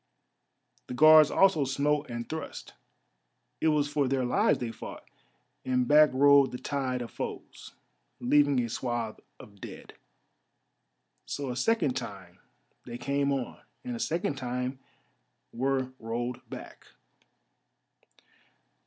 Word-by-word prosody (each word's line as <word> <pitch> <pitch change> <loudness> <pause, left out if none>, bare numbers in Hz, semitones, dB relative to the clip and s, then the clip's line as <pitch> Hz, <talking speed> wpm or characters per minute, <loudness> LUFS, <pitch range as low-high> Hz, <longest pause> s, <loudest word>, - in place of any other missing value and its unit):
The 125 - -6
Guards 155 +2 +8
also 190 -6 +4
smote 140 +2 0
and 120 -1 -5
thrust; 160 0 -7 0.9
it - - +2
was 150 -2 +2
for 145 -2 0
their 130 -1 0
lives 205 - +2
they 120 -2 -4
fought, - - -9 0.6
and 125 -1 0
back 150 +2 +6
rolled 140 +1 +5
the 125 - -5
tide 130 -2 -2
of 115 - -9
foes, - - -7 0.5
leaving 145 +1 +3
a 120 - -2
swathe 120 -1 -3 0.2
of 100 -1 -15
dead. - - -10 1.3
So 140 -3 -4
a - - -5
second 170 - +1
time 100 -7 -7 0.4
they 120 - -7
came 140 +2 0
on, 135 -3 -3 0.2
and 250 -2 -4
a - - -6
second 165 -7 -1
time 125 +1 -3 0.7
were 130 +1 -1
rolled 120 +2 -4
back. - - -10
135 Hz, 125 wpm, -28 LUFS, 120-145 Hz, 1.3 s, Guards